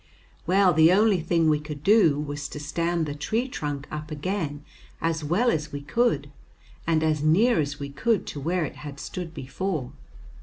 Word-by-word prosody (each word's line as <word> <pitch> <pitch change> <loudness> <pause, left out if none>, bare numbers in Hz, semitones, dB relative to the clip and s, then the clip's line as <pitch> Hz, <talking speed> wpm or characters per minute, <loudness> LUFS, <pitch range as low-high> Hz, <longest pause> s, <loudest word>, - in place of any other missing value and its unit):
Well, 185 0 +4
the 160 +2 +6
only 205 0 +4
thing 165 0 +1
we 155 -1 +3
could 150 -1 -8
do 195 -8 +5
was 145 0 -4
to - - -7
stand 165 +3 -1
the 145 - -4
tree 215 - -1
trunk 145 - -4
up 150 0 -5
again 150 -2 -3 0.3
as 165 -1 -1
well 195 +11 +2
as 150 -1 -2
we 145 - -5
could, 145 - 0 0.6
and 160 -1 +2
as 155 -2 +1
near 205 +11 +4
as 145 -1 -2
we 140 0 -5
could 205 - 0
to 145 - -6
where 170 +4 0
it - - -8
had 145 -2 -8
stood 175 +2 -6
before. 145 0 -3
155 Hz, 185 wpm, -26 LUFS, 145-180 Hz, 0.6 s, the